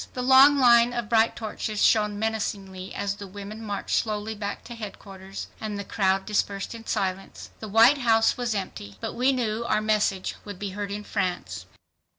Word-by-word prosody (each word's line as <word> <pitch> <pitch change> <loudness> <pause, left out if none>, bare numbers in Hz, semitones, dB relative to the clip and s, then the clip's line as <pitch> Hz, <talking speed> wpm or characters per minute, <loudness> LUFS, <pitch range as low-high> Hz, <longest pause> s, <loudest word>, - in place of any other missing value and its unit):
The 250 - -2
long 265 +3 +7
line 240 -2 +5
of 240 -3 -3
bright 225 0 +3
torches 215 -1 -4
shone 210 -2 +3
menacingly 200 -4 -3
as 200 0 -2
the 200 - -8
women 205 +3 -8
marched 205 -2 -2
slowly 215 0 -2
back 205 -1 -5
to 240 - -9
headquarters, 195 -3 -8
and 215 -2 -4
the 200 - -4
crowd 195 -2 0
dispersed 200 -1 -1
in 230 -1 -11
silence. 190 0 -3
The 215 - -7
White 230 +7 +6
House 225 -3 +3
was 240 -3 -2
empty. 100 - -6
But - - -4
we 255 +3 +2
knew 235 -3 -1
our 215 -2 +1
message 210 -3 0
would 205 -2 -8
be 200 0 -5
heard 205 +1 -4
in 205 +1 -5
France. 185 -4 -3
210 Hz, 180 wpm, -25 LUFS, 200-230 Hz, -, long